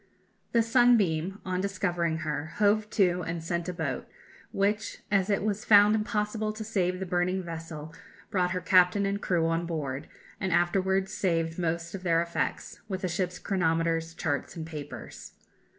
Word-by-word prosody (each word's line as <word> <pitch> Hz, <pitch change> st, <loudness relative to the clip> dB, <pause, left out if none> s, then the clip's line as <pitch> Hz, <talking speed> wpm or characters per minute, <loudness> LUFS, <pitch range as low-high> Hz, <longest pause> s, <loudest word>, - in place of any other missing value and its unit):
The 230 Hz, -1 st, +4 dB
Sunbeam, 210 Hz, -7 st, +3 dB
on 185 Hz, -1 st, -1 dB
discovering 175 Hz, -4 st, -1 dB
her, 150 Hz, +1 st, -3 dB
hove 210 Hz, +1 st, +2 dB
to, 180 Hz, -4 st, +2 dB
and 165 Hz, -1 st, -4 dB
sent 170 Hz, +1 st, -2 dB
a -, -, -3 dB
boat, 155 Hz, -7 st, -3 dB, 0.4 s
which, 205 Hz, +2 st, 0 dB
as 195 Hz, -1 st, +2 dB
it 200 Hz, -1 st, +1 dB
was 210 Hz, 0 st, -1 dB
found 205 Hz, 0 st, +7 dB
impossible 215 Hz, 0 st, -1 dB
to 220 Hz, +1 st, -6 dB
save 185 Hz, -4 st, 0 dB
the 190 Hz, -, -3 dB
burning 180 Hz, +1 st, 0 dB
vessel, 165 Hz, -2 st, -7 dB, 0.4 s
brought 180 Hz, -4 st, +2 dB
her 180 Hz, 0 st, -2 dB
captain 185 Hz, +2 st, +4 dB
and 200 Hz, +1 st, -1 dB
crew 170 Hz, -3 st, +1 dB
on 165 Hz, +1 st, 0 dB
board, 145 Hz, -5 st, -3 dB, 0.3 s
and 190 Hz, -, -1 dB
afterwards 190 Hz, +3 st, +1 dB
saved 165 Hz, -2 st, 0 dB
most 170 Hz, 0 st, -2 dB
of 195 Hz, -, -5 dB
their 170 Hz, -2 st, +2 dB
effects, 170 Hz, 0 st, -2 dB
with 190 Hz, -1 st, -3 dB
the 185 Hz, -, 0 dB
ship's 180 Hz, +1 st, -2 dB
chronometers, 165 Hz, -3 st, 0 dB
charts, 145 Hz, -4 st, -2 dB
and 160 Hz, -2 st, -5 dB
papers. 150 Hz, -3 st, -8 dB
180 Hz, 165 wpm, -28 LUFS, 165-200 Hz, 0.4 s, found